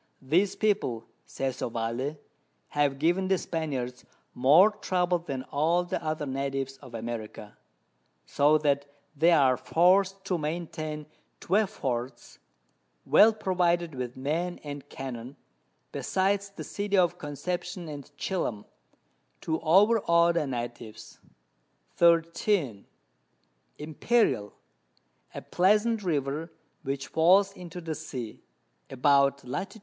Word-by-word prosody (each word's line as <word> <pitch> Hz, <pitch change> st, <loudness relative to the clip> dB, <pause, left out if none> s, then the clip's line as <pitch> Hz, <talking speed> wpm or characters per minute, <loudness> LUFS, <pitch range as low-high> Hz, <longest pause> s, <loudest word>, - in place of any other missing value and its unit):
These 180 Hz, +9 st, +2 dB
People, 195 Hz, -, 0 dB, 0.2 s
says 135 Hz, -1 st, -4 dB
Ovalle, 120 Hz, +6 st, -3 dB, 0.5 s
have 145 Hz, -2 st, +1 dB
given 175 Hz, +6 st, +1 dB
the 190 Hz, 0 st, +2 dB
Spaniards 135 Hz, -8 st, -4 dB, 0.3 s
more 155 Hz, +12 st, +6 dB
trouble 180 Hz, -3 st, 0 dB
than 135 Hz, -6 st, -5 dB
all 165 Hz, +5 st, +2 dB
the 175 Hz, -, -4 dB
other 155 Hz, -1 st, -2 dB
Natives 135 Hz, 0 st, -3 dB
of 130 Hz, -4 st, -12 dB
America; 110 Hz, -2 st, -6 dB, 0.7 s
so 150 Hz, +2 st, +3 dB
that 145 Hz, -2 st, 0 dB, 0.3 s
they 160 Hz, +4 st, +4 dB
are 135 Hz, -6 st, +5 dB
forced 190 Hz, +3 st, +2 dB
to 180 Hz, -3 st, -1 dB
maintain 155 Hz, -1 st, -4 dB, 0.4 s
12 205 Hz, +2 st, +2 dB
Forts, 125 Hz, -, -5 dB, 0.7 s
well 220 Hz, -, +6 dB
provided 175 Hz, -5 st, 0 dB
with 125 Hz, -1 st, -5 dB
Men 165 Hz, +7 st, -2 dB
and 145 Hz, -1 st, -8 dB
Cannon, 130 Hz, 0 st, -7 dB, 0.6 s
besides 195 Hz, +1 st, 0 dB
the 195 Hz, -, -9 dB
City 200 Hz, -1 st, -2 dB
of 175 Hz, -2 st, +2 dB
Conception 175 Hz, +4 st, -5 dB
and 145 Hz, -3 st, -8 dB
Chillam, 135 Hz, -, -3 dB, 0.8 s
to 160 Hz, 0 st, -1 dB
over 200 Hz, +8 st, +5 dB
aw 170 Hz, 0 st, +5 dB
the 170 Hz, -4 st, -1 dB
Natives. 120 Hz, -3 st, -7 dB, 0.8 s
13. 165 Hz, -, +2 dB, 0.9 s
Imperial, 150 Hz, -, 0 dB, 0.8 s
a -, -, -6 dB
pleasant 210 Hz, +4 st, +2 dB
River, 155 Hz, -2 st, -2 dB, 0.3 s
which 135 Hz, -2 st, -3 dB
falls 190 Hz, +5 st, +4 dB
into 180 Hz, -2 st, -9 dB
the 165 Hz, -2 st, -4 dB
Sea, 130 Hz, -7 st, -7 dB, 0.5 s
about 140 Hz, +1 st, +3 dB
Lat. 190 Hz, -, -4 dB
155 Hz, 115 wpm, -28 LUFS, 135-180 Hz, 0.9 s, more